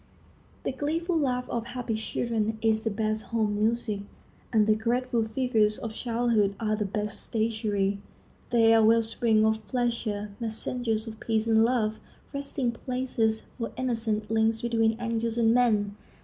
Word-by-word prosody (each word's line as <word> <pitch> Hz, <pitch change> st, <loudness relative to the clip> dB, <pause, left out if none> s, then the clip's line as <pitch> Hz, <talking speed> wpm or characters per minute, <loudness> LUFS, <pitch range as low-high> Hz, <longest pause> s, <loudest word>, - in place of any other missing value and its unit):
The -, -, -1 dB
gleeful 320 Hz, +6 st, -1 dB
laugh 250 Hz, -5 st, 0 dB
of 235 Hz, -1 st, -3 dB
happy 245 Hz, -2 st, -3 dB
children 220 Hz, 0 st, -1 dB
is 220 Hz, 0 st, +2 dB
the 225 Hz, -, -1 dB
best 215 Hz, 0 st, -1 dB
home 220 Hz, -3 st, 0 dB
music, 215 Hz, 0 st, 0 dB, 0.5 s
and 215 Hz, -2 st, +4 dB
the 215 Hz, -, +4 dB
graceful 235 Hz, +1 st, 0 dB
figures 220 Hz, -3 st, +1 dB
of 225 Hz, -1 st, -5 dB
childhood 230 Hz, -4 st, +1 dB
are 215 Hz, -2 st, 0 dB
the 210 Hz, -1 st, -1 dB
best 210 Hz, +1 st, -3 dB
statuary. 215 Hz, -3 st, 0 dB, 0.5 s
They 225 Hz, -1 st, +5 dB
are 225 Hz, -, +6 dB
well 230 Hz, +1 st, +5 dB
springs 225 Hz, -1 st, +2 dB
of 220 Hz, -1 st, 0 dB
pleasure, 230 Hz, -4 st, -1 dB
messengers 225 Hz, 0 st, -2 dB
of 220 Hz, -1 st, -8 dB
peace 220 Hz, -1 st, 0 dB
and 225 Hz, -1 st, +4 dB
love, 225 Hz, -3 st, +1 dB, 0.4 s
resting 280 Hz, -3 st, -1 dB
places 235 Hz, -2 st, -1 dB, 0.2 s
for 230 Hz, -, -3 dB
innocence, 225 Hz, -4 st, -1 dB
links 225 Hz, 0 st, +2 dB
between 225 Hz, -1 st, +1 dB
angels 230 Hz, -1 st, -1 dB
and 230 Hz, -1 st, +4 dB
men. 210 Hz, -5 st, +2 dB
225 Hz, 150 wpm, -27 LUFS, 215-240 Hz, 0.5 s, are